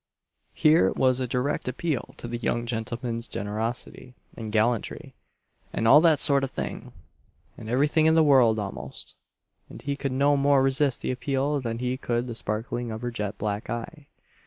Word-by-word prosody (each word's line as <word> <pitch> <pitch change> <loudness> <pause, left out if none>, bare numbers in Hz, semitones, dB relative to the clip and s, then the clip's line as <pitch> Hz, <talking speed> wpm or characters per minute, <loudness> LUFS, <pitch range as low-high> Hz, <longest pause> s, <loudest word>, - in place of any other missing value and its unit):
Here 155 -12 +4
was 130 -1 +2
a 130 - -1
direct 125 +4 -1
appeal 140 +2 -3
to - - -6
the 120 0 -4
young 120 0 -1
gentleman's 115 +1 -3
generosity, 115 +4 -4 0.2
and 110 -2 -6
gallantry, 110 +1 -1 0.6
and 115 - -1
all 145 +6 +8
that 160 -3 +4
sort 140 -2 +4
of 135 - -1
thing, - - -6 0.6
and 110 - -9
everything 145 +5 +3
in 160 - +4
the 160 - +5
world 130 -7 +5
almost; 85 -10 -6 0.6
and - - -10
he 140 0 -2
could 140 -1 -3
no 140 +2 +3
more 140 -1 +3
resist 135 0 +1
the - - -1
appeal 140 +2 -1
than 115 -2 -3
he 125 +1 -2
could 120 -1 -1
the 120 - -5
sparkling 115 +2 -2
of 110 +1 -6
her 120 - -2
jet 105 -3 -4
black 105 0 -3
eye. 140 +6 -6
125 Hz, 175 wpm, -26 LUFS, 115-140 Hz, 0.6 s, all